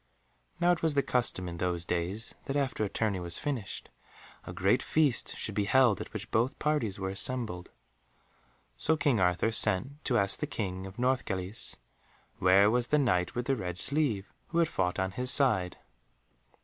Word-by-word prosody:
Now, 175 0 +4
it 175 - 0
was 160 -3 +1
the 140 - +3
custom 115 -7 -1
in 85 -1 -6
those 85 -1 -2
days 90 +6 -3
that 135 - -3
after 135 -6 -1
a 105 - -1
tourney 105 -4 -1
was 85 -1 -4
finished, 130 -9 -4 0.6
a - - -7
great - - +1
feast 145 -9 +1
should - - -1
be 105 - 0
held 125 -1 +3
at - - -8
which 110 0 -7
both 120 +4 +1
parties 150 -10 -1
were 95 -1 -3
assembled, 100 -3 -2 1.1
so 160 - +2
King 145 -7 +1
Arthur 90 +4 +2
sent 115 +8 +2
to 120 - +2
ask 100 -2 +3
the - - -2
King 95 -3 -4
of 95 - -12
Northgalis, 115 -6 -1 0.6
where 95 +3 +5
was 120 0 +1
the 150 - +2
Knight 90 -11 +1
with 120 0 -2
the 135 0 +1
red 90 -6 -5
sleeve, 125 -3 0
who 170 - -4
had 170 -2 +3
fought 90 0 -1
on 95 0 -1
his 125 +6 -3
side. 110 - +3
110 Hz, 180 wpm, -30 LUFS, 95-130 Hz, 1.1 s, where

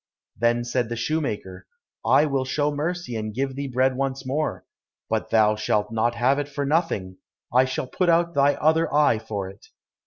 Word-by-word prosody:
Then 120 +2 +1
said 120 -1 -1
the 120 - -3
shoemaker, 115 - -3 0.4
"I 150 - +4
will 135 -3 0
show 145 +3 0
mercy 155 -2 -3
and 110 -1 -4
give 135 +1 -2
thee 140 0 -3
bread 130 0 +1
once 135 0 -2
more, 150 +4 -2 0.5
but - - -1
thou 110 -1 +4
shalt 105 0 0
not 115 +1 0
have 130 +4 +2
it 145 0 -3
for 145 0 -3
nothing, 140 - -1 0.4
I 130 +1 +5
shall 130 0 -3
put 175 +7 0
out 170 0 +3
thy 140 -1 +3
other 160 +1 +2
eye 145 -6 +3
for 105 -3 -4
it." 100 +2 -13
130 Hz, 185 wpm, -24 LUFS, 115-145 Hz, 0.5 s, I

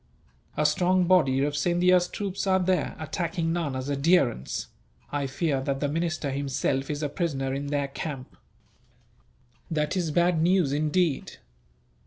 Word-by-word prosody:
"A 150 - +2
strong 180 +4 +3
body 150 -7 +3
of 145 0 -1
Scindia's 175 +3 +3
troops 200 -1 -4
are 190 0 +4
there, 185 0 0
attacking 165 +1 -2
Nana's 140 -6 -2
adherents. 140 - +1 0.5
I 145 -1 -1
fear 135 0 -1
that 135 0 -2
the 145 - 0
minister 155 -1 -2
himself 135 0 -1
is 150 0 -3
a - - +1
prisoner 140 -4 -2
in 140 +1 -3
their 140 -1 -1
camp." 140 -1 -6 1.3
"That 150 -1 -1
is 175 -4 0
bad 175 +1 +2
news, 175 -4 +3
indeed. 155 +1 0
150 Hz, 140 wpm, -26 LUFS, 140-175 Hz, 1.3 s, are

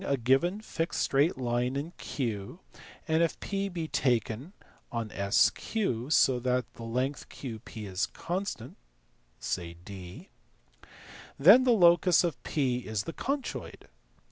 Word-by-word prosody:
a 140 - 0
given 135 - +2
fixed 170 -6 -3
straight 140 +4 +2
line 125 0 -1
in 145 +5 -3
Q 110 - -4 0.5
and 160 0 +2
if 170 - 0
P 200 0 -2
be 170 -3 -4
taken 125 - 0 0.4
on 115 -3 -3 0.2
SQ - - +4 0.5
so 130 -5 +4
that 125 0 0
the - - -13
length 125 +5 -2
QP 110 -4 -8
is 95 +3 -1
constant 175 - -5 0.6
(say 85 -1 -3
d), 95 -3 -10 1.1
then 205 - +8
the 250 - +5
locus 175 -3 +5
of 170 -3 -2
P 130 -5 0
is 110 -4 -3
the 165 - -6
conchoid. 275 -1 -4
135 Hz, 130 wpm, -29 LUFS, 115-170 Hz, 1.1 s, then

